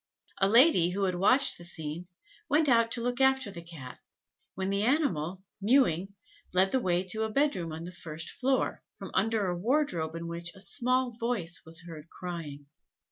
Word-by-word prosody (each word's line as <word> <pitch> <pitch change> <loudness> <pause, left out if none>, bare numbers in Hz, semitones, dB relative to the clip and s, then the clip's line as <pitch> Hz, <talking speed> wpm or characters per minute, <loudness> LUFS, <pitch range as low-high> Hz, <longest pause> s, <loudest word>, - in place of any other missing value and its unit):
A 195 - +3
lady, 230 - +6
who 195 +2 -2
had 185 -1 +1
watched 200 +9 +3
this 175 0 -5
scene, 160 +2 -5 0.4
went 300 +2 +3
out 230 -3 +4
to 240 - -2
look 245 +2 -1
after 265 -5 +3
the 170 - -8
Cat, 155 -7 -10 0.6
when 190 +1 -2
the 200 0 0
animal, 190 - 0 0.2
mewing, 200 - +2 0.4
led 190 +1 +4
the 260 - +2
way 180 -5 +1
to 205 +4 -3
a 220 - 0
bed 285 +5 +2
room 170 -3 -4
on 160 +1 -6
the 175 - -7
first 165 -2 -6
floor, 265 0 0 0.2
from - - -8
under 225 -2 +1
a 180 -1 -1
wardrobe 180 - 0
in 165 0 -5
which 170 0 -5
a - - -13
small 255 +4 0
voice 230 -7 -2
was 165 +1 -6
heard 165 -2 -10
crying. 160 -5 -7
190 Hz, 190 wpm, -29 LUFS, 170-245 Hz, 0.6 s, lady